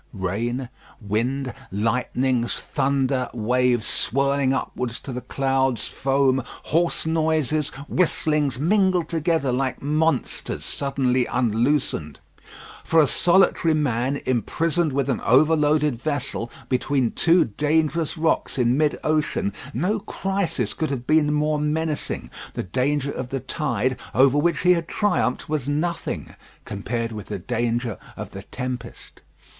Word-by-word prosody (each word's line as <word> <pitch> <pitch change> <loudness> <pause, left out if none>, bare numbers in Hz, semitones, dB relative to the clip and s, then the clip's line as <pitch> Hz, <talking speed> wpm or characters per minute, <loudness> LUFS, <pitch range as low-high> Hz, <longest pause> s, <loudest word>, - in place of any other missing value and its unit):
Rain, 115 +6 -2 0.3
wind, 120 +5 -1 0.2
lightnings, 120 +3 0
thunder, 135 -2 0
waves 120 0 +2
swirling 140 +1 +1
upwards 125 -2 -3
to 135 - -7
the 125 - -4
clouds, 135 -4 0
foam, 135 -1 +1 0.2
hoarse 170 +2 +1
noises, 155 -2 +1 0.2
whistlings, 150 -6 +1
mingled 185 +2 +2
together 165 -4 0
like 130 +1 -1
monsters 155 +3 -1
suddenly 130 -3 0
unloosened. 120 - 0 0.6
For 165 - +3
a 155 - +7
solitary 170 +1 +3
man, 135 -2 0
imprisoned 155 - 0
with 135 0 0
an 135 - -1
overloaded 150 0 +3
vessel, 135 -5 -2 0.2
between 130 -1 +1
two 170 +1 +4
dangerous 155 - 0
rocks 160 -3 0
in 125 -1 +3
mid 150 -1 +2
ocean, 155 -9 0 0.2
no 185 - 0
crisis 190 - -2
could 160 - -2
have 130 -3 -3
been 155 +1 +3
more 150 0 +1
menacing. 150 +1 -2 0.2
The - - -2
danger 140 +7 0
of 130 -2 -5
the 135 - -2
tide, 130 -4 -1 0.2
over 135 +2 +5
which 170 +3 +1
he 180 - +5
had 170 -1 -2
triumphed, 180 -11 0
was 150 -3 -2
nothing 165 +4 -2 0.3
compared 115 +3 -3
with 105 -2 -7
the 105 - -4
danger 120 +2 -2 0.2
of - - -6
the 95 - -7
tempest. 125 +2 -7
135 Hz, 125 wpm, -23 LUFS, 125-155 Hz, 0.6 s, a